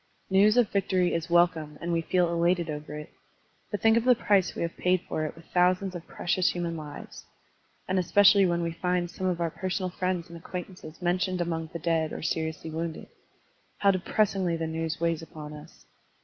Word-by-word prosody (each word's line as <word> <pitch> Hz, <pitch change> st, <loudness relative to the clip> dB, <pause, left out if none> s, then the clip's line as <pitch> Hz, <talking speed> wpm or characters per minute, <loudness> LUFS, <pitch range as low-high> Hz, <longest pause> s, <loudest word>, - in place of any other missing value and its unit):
News 205 Hz, +4 st, +5 dB
of 245 Hz, -3 st, +5 dB
victory 185 Hz, -3 st, +1 dB
is 165 Hz, 0 st, -2 dB
welcome 170 Hz, -3 st, +2 dB
and 170 Hz, 0 st, -2 dB
we 165 Hz, -, +1 dB
feel 175 Hz, 0 st, +1 dB
elated 170 Hz, -1 st, +1 dB
over 150 Hz, 0 st, -6 dB
it. 150 Hz, -, -9 dB, 0.6 s
But 205 Hz, -, -3 dB
think 225 Hz, 0 st, +6 dB
of 230 Hz, -, +2 dB
the 250 Hz, 0 st, +5 dB
price 200 Hz, -5 st, +2 dB
we -, -, -2 dB
have 170 Hz, -, -3 dB
paid 180 Hz, 0 st, +2 dB
for 155 Hz, -, -2 dB
it 155 Hz, -, -5 dB
with 165 Hz, 0 st, -15 dB
thousands 185 Hz, +1 st, +2 dB
of 175 Hz, -2 st, -8 dB
precious 180 Hz, +1 st, 0 dB
human 170 Hz, -1 st, -3 dB
lives. 150 Hz, -2 st, -9 dB, 0.6 s
And 185 Hz, 0 st, +1 dB
especially 200 Hz, +2 st, +5 dB
when 170 Hz, -1 st, 0 dB
we 170 Hz, -, -1 dB
find 175 Hz, +1 st, -1 dB
some 185 Hz, +1 st, -3 dB
of 180 Hz, -2 st, 0 dB
our 170 Hz, -1 st, 0 dB
personal 185 Hz, +1 st, -3 dB
friends 185 Hz, -1 st, -2 dB
and 170 Hz, -, -11 dB
acquaintances 180 Hz, -1 st, -8 dB
mentioned 180 Hz, +1 st, 0 dB
among 165 Hz, -2 st, -2 dB
the -, -, -4 dB
dead 165 Hz, -1 st, 0 dB
or -, -, -6 dB
seriously 160 Hz, 0 st, -2 dB
wotmded, 165 Hz, 0 st, -5 dB, 0.7 s
how 200 Hz, -1 st, +4 dB
depressingly 190 Hz, -2 st, 0 dB
the 165 Hz, -, -2 dB
news 160 Hz, 0 st, -3 dB
weighs 170 Hz, -1 st, 0 dB
upon 150 Hz, -2 st, -9 dB
us! 150 Hz, 0 st, -13 dB
175 Hz, 195 wpm, -28 LUFS, 165-185 Hz, 0.7 s, think